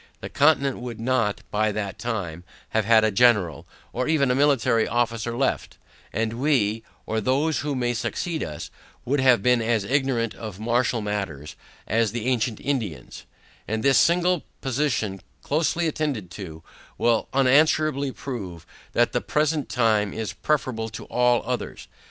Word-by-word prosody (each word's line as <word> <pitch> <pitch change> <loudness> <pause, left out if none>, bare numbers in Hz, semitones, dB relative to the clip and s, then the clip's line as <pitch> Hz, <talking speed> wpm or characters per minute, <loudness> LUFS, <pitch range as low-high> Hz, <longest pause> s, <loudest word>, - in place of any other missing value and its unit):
The - - -7
Continent, 140 -2 +3
would 120 -2 -7
not, 115 -3 0
by 105 +1 +1
that 100 -2 -4
time, 90 -9 -4 0.3
have 110 -2 0
had 110 0 +5
a 110 - +3
General, 105 -6 +3 0.3
or 125 +2 -1
even 145 -5 +2
a - - +3
military 130 -5 +3
officer 120 0 -1
left; 135 0 -1 0.3
and 115 +1 -2
we, 115 -7 +2 0.2
or 110 0 -1
those 140 +7 +1
who 145 -1 -2
may 120 -1 0
succeed 160 +7 -3
us, 75 -1 -7 0.3
would 140 +3 +1
have 125 -6 +4
been 125 -1 +4
as 110 -2 +1
ignorant 130 -2 0
of 105 -4 -8
martial 120 +1 +1
matters 85 -7 -4 0.3
as 115 -1 +1
the 120 -1 -3
ancient 120 -3 0
Indians: 110 - -4 0.4
And 110 0 -2
this 135 -1 +5
single 175 0 +3 0.2
position, 120 -7 -1 0.2
closely 165 +3 0
attended 140 - -2
to, 80 -6 -8 0.3
will 115 -1 +2
unanswerably 140 +1 +3
prove, 95 -13 -7 0.3
that - - +3
the - - 0
present 150 -1 0
time 110 -4 +1
is 110 -1 -4
preferable 125 -7 -1
to 110 - -8
all 125 -1 +2
others. 125 0 -4
120 Hz, 150 wpm, -24 LUFS, 110-135 Hz, 0.4 s, had